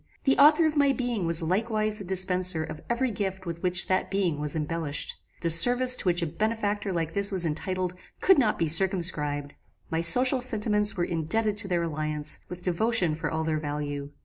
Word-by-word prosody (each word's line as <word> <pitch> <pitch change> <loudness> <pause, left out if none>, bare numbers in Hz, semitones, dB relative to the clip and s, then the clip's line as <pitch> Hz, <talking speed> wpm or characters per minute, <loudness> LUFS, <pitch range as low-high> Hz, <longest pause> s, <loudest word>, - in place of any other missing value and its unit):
The 270 - +2
author 300 +3 +6
of 310 -1 -1
my 285 -2 +3
being 240 -9 -3
was 165 0 +5
likewise 215 +4 -1
the - - -7
dispenser 185 -2 -1
of 155 - -9
every 240 +1 -1
gift 190 -2 -5
with 170 -1 -6
which 180 -1 +1
that 185 0 -1
being 185 -6 -1
was 150 0 -4
embellished. 155 -1 -3 0.3
The 170 - 0
service 245 +9 +5
to - - -5
which 175 0 +1
a - - 0
benefactor 210 +3 -3
like 165 -2 -3
this 200 0 +1
was 185 -3 +1
entitled, 180 +3 -3 0.3
could 380 -6 +4
not 220 -5 +1
be 165 - -1
circumscribed. 155 -5 0 0.4
My 165 0 -1
social 250 +10 +6
sentiments 210 -3 +2
were 175 - 0
indebted 200 +6 0
to 205 -1 0
their 175 -2 -1
alliance 155 -1 -2
with 180 0 -9
devotion 185 -1 0
for 155 0 -4
all 160 0 -3
their 155 -1 -2
value. 145 -1 -5
180 Hz, 195 wpm, -26 LUFS, 160-215 Hz, 0.4 s, author